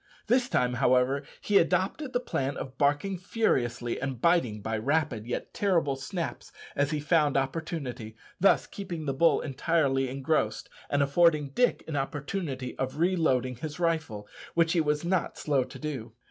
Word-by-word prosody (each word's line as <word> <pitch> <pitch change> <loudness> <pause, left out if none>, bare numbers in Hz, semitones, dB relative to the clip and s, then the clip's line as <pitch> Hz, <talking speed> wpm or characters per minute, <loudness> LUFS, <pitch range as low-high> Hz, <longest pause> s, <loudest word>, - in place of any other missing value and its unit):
This 250 +2 +2
time, 125 0 +1
however, 130 +2 +3 0.2
he 205 -1 +4
adopted 190 - 0
the 245 - +1
plan 140 - -2
of 130 -1 -6
barking 145 +7 +1
furiously 120 - 0
and 135 -2 -3
biting 130 -10 +2
by 110 +1 -2
rapid 135 -3 0
yet 120 - -4
terrible 170 -9 +1
snaps 165 +6 -5 0.2
as 140 0 +1
he 155 -1 -1
found 150 -2 +2
opportunity, 135 -5 -3 0.2
thus 195 - +4
keeping 175 -6 -6
the 135 - -1
bull 165 +5 +3
entirely 135 -2 +1
engrossed, 135 -5 -1 0.2
and 145 0 +2
affording 150 0 +3
Dick 245 - +1
an 160 - -4
opportunity 140 -1 -3
of 130 +2 -2
reloading 155 -8 +1
his 155 +6 -6
rifle, 155 -12 -1 0.3
which 165 0 +3
he 170 - +3
was 150 +1 0
not 180 0 0
slow 140 -4 +1
to - - -11
do. 130 -7 -5
145 Hz, 160 wpm, -28 LUFS, 130-170 Hz, 0.3 s, he